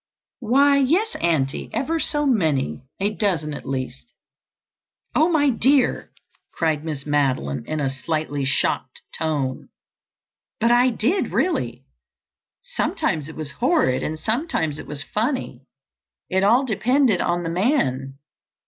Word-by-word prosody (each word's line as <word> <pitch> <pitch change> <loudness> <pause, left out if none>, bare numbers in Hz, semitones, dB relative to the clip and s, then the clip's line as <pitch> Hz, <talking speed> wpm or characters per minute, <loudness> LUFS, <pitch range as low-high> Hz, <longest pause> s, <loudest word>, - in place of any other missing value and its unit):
"Why, 280 +4 +4
yes, 350 +12 +2
Auntie, 150 -5 0
ever 325 +5 -1
so 295 -1 0
many. 150 - 0
A 200 +2 +1
dozen, 170 -9 -1
at - - -8
least." 130 - -5 1.0
"Oh, 315 +3 +4
my 290 -4 +3
dear!" 260 +2 +2 0.4
cried 160 -3 0
Miss 150 -4 -5
Madeline 130 - 0
in 155 0 -2
a 140 - 0
slightly 145 +1 -2
shocked 130 -1 -1
tone. 145 -5 -2 0.9
"But 230 +1 +3
I 245 +1 +5
did, 250 - 0
really. 125 - -1 0.8
Sometimes 155 -1 -1
it 160 - -10
was 155 -3 -5
horrid 240 - +1
and 155 - -3
sometimes 220 - -1
it - - -9
was 145 0 -5
funny. 215 - -3 0.6
It 190 +1 +1
all 240 +7 +4
depended 245 -2 +2
on 175 0 0
the 165 - -2
man. 140 - 0
170 Hz, 130 wpm, -22 LUFS, -, 1.0 s, I